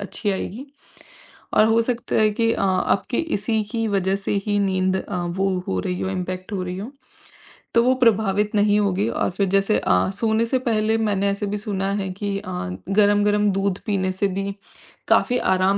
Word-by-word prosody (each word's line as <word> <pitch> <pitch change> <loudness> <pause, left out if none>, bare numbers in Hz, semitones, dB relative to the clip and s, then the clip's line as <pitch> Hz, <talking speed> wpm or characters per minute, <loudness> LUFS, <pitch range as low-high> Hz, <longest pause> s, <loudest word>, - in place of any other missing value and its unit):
अच्छी 205 +1 -3
आएगी। 215 +7 -5 0.9
और - - +6
हो 225 +1 +3
सकता 240 0 -2
है 215 -1 +4
कि 230 +2 +1
अ, - - -3
आपके 195 +5 +1 0.2
इसी 215 +2 -1
की 225 -1 -1
वजह 195 -1 +1
से 195 - -3
ही 205 -1 +1
नींद 190 -1 +1
अ, 190 0 -4
वो 190 +3 -1 0.2
हो 95 - -1
रही 180 - -3
हो, - - -2
इम्पैक्ट 185 +1 -5
हो 190 -2 -2
रही 180 0 -5
हो 220 +7 -7 0.8
तो 235 - +6
वो 255 +2 +4
प्रभावित 210 -2 +2
नहीं 205 0 +3
होगी 200 +1 0
और - - -1
फिर 195 +2 0
जैसे 195 +2 +2
अ, - - +2
सोने 220 +2 +1
से 260 +2 +1
पहले 220 0 +2
मैंने 200 -3 +1
ऐसे 200 +1 -2
भी 205 +1 -2
सुना 200 -2 -2
है 190 - -3
कि 200 -1 -2
अ, 200 -2 -8 0.4
गरम-गरम 205 0 +3
दूध 195 0 -1
पीने 190 -2 0
से 195 +2 0
भी 195 0 -2 0.6
काफ़ी 250 -1 +3 0.2
आराम 190 +1 +2
200 Hz, 190 wpm, -22 LUFS, 190-215 Hz, 0.9 s, और